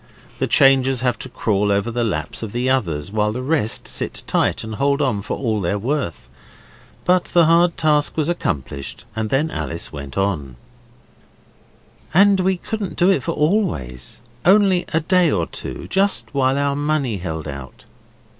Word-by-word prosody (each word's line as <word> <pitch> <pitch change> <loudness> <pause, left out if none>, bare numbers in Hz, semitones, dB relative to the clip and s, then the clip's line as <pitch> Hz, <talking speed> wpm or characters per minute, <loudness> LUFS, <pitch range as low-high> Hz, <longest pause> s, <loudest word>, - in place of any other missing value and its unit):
The - - 0
changers 135 -2 +4
have 125 -3 0
to 130 - -6
crawl 105 -4 0
over 100 +3 0
the 120 +1 -1
laps 80 -9 -3
of 110 -2 -6
the 120 +2 -1
others, 90 - -1
while 105 0 +1
the 125 +3 -4
rest 140 -6 +1
sit - - -1
tight - - 0
and 110 0 -6
hold 140 +5 +1
on 130 -8 0
for 105 - -4
all 110 -5 -1
they're 95 +3 0
worth. 120 - -3 0.8
But 180 0 +3
the 170 -2 +3
hard 170 +1 +3
task 150 -2 +2
was 155 -2 +1
accomplished 75 - -3
and 110 -1 -2
then 150 +6 +1
Alice 85 -1 -5
went 70 -2 -7
on 85 -10 -1 1.6
'And 200 +1 +6
we 185 0 +1
couldn't 210 +1 -5
do 180 +3 +4
it 190 - +1
for 170 - -2
always, 150 - -1 0.2
only 190 -1 +4
a 160 - +1
day 180 +1 +3
or 90 - 0
two - - -7
just 195 -3 +1
while 135 -1 +2
our 140 0 0
money 145 -6 -1
held 80 -4 -5
out. 70 -2 -9
130 Hz, 170 wpm, -20 LUFS, 100-160 Hz, 1.6 s, And